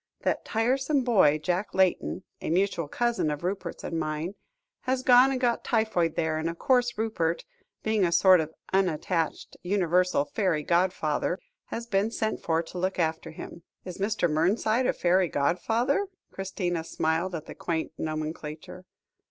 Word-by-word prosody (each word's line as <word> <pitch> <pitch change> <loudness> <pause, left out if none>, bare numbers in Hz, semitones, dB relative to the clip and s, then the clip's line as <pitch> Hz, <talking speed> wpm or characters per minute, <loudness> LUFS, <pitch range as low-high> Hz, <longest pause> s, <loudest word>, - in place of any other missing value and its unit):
That - - 0
tiresome 265 +5 +1
boy, 190 - +4
Jack 180 +7 -2
Layton, 190 0 +1 0.2
a - - -3
mutual 175 -2 +1
cousin 235 -2 0
of 150 +2 -4
Rupert's 190 +2 -4
and 165 - -2
mine, 155 +3 -3 0.5
has 255 0 -1
gone 250 +1 +7
and 260 - -1
got 240 -2 +1
typhoid 220 -8 +1
there, 160 -1 0
and 160 +1 -1
of 170 - -6
course 245 0 +2
Rupert, 175 -7 -1 0.4
being 220 -2 +1
a 175 - +2
sort 185 +1 +6
of 160 0 -2 0.2
unattached, 175 -3 0
universal 180 -4 +2
fairy 175 -5 0
godfather, 175 -1 +1 0.3
has 235 - -5
been 205 -1 +1
sent 220 -1 -2
for 165 0 0
to 180 +2 -8
look 185 +1 -1
after 160 -2 -1
him." 170 +1 -9 0.2
"Is 180 0 -7
Mr. 200 -2 +1
Mernside 215 +10 +1
a - - +2
fairy 180 +1 +2
godfather?" 225 - +1 0.2
Christina 180 -3 -3
smiled 165 +3 -1
at 160 -1 -6
the - - -8
quaint 165 -2 -3
nomenclature. 155 +2 -5
180 Hz, 155 wpm, -27 LUFS, 160-220 Hz, 0.5 s, gone